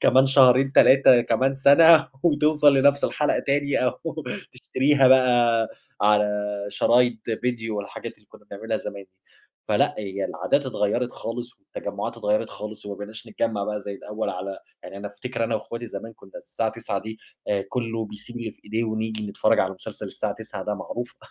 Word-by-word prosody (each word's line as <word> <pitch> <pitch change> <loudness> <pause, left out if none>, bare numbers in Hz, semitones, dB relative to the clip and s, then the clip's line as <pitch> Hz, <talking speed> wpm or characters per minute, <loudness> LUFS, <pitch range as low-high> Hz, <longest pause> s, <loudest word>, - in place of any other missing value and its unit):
كمان 130 +1 +5
شهرين 135 0 +5
3 130 -3 +6
كمان 130 +4 +1
سنة 160 +4 +6
وتوصل 150 -3 +4
لنفس 140 +1 +4
الحلقة 150 - 0
تاني، 140 0 0
أو 125 - +2 0.6
تشتريها 135 +2 +2
بقى 120 -3 +4 0.3
على 105 0 +4 0.4
شرايط 120 +1 +1
فيديو 115 -3 -2
والحاجات 105 +3 -7
اللي 105 - -28
كنا 105 - -19
بنعملها 110 +2 -3
زمان 100 -2 -7
دي. - - -38 0.6
فلأ - - +2
هي 100 -1 -4
العادات 140 -2 -1
اتغيرت 120 +1 -1
خالص 120 +2 -6
والتجمعات - - -6
اتغيرت 105 +2 -1
خالص، 105 0 -8
وما 100 - -5
بقيناش 110 +3 -9
نتجمّع 110 -1 -2
بقى 105 0 -3
زي 100 - -6
الأوّل 105 +2 -4
على 95 +1 -6 0.2
يعني 100 - -10
أنا 100 +1 -6
أفتكر 115 +3 -4
أنا 115 0 -1
وأخواتي 115 +2 -5
زمان 115 0 -8
كنا 95 - -18
الساعة 110 -1 -3
21:00 110 -3 -4
دي 110 +1 -8 0.3
آآ، 100 -1 0
كلّه 115 -3 -3
بيسيب 105 +4 -9
اللي 115 -2 -4
في - - -31
إيديه 110 +3 -2
ونيجي 110 -1 -3
نتفرج 100 +2 +2
على 95 0 -1
مسلسل - - -8
الساعة - - -3
21:00 - - -7
ده 105 - -2
معروفة. 120 +5 -6
115 Hz, 170 wpm, -24 LUFS, 105-130 Hz, 0.6 s, 3